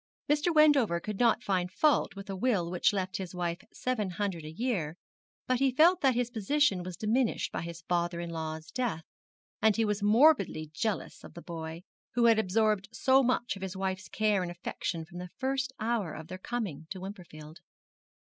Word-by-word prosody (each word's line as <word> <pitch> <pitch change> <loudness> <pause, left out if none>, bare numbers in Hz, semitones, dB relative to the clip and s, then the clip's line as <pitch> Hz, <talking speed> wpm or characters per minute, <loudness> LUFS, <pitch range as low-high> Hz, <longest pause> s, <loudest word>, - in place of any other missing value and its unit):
Mr. 295 +4 +2
Wendover 290 - +5
could 205 +3 -5
not 235 0 +3
find 185 -4 0
fault 295 +3 +2
with 195 +1 -8
a 195 - -4
will 190 -5 0
which 180 - +3
left 185 -2 -2
his 185 -2 -6
wife 175 -1 -2
seven 235 -6 -2
hundred 180 -2 -3
a 155 - -7
year; 175 -6 -2 0.5
but 255 -1 +1
he 270 0 +4
felt 345 +5 +5
that 265 -3 +3
his 245 0 0
position 220 -2 +2
was 175 -1 -7
diminished 225 +4 0
by - - -3
his 170 0 -7
father 175 -1 0
in 170 0 -5
law's 160 0 -5
death, 235 -11 -2 0.6
and 220 -2 +4
he 225 - +2
was 210 -1 -1
morbidly 205 - +4
jealous 220 +1 -3
of - - -12
the 170 - -8
boy, 165 0 -6 0.3
who 240 -1 +4
had 225 -1 +6
absorbed 210 0 +1
so 265 +3 +4
much 245 -3 0
of 195 - -10
his 190 0 -5
wife's 190 0 -3
care 210 -3 +1
and 180 - -3
affection 170 -1 -4
from 175 +2 -10
the 180 0 -7
first 265 0 -1
hour 220 -6 -1
of 160 - -9
their 185 0 -6
coming 185 -9 -4
to 190 - -5
Wimperfield. 175 -5 -10
195 Hz, 195 wpm, -30 LUFS, 175-240 Hz, 0.6 s, had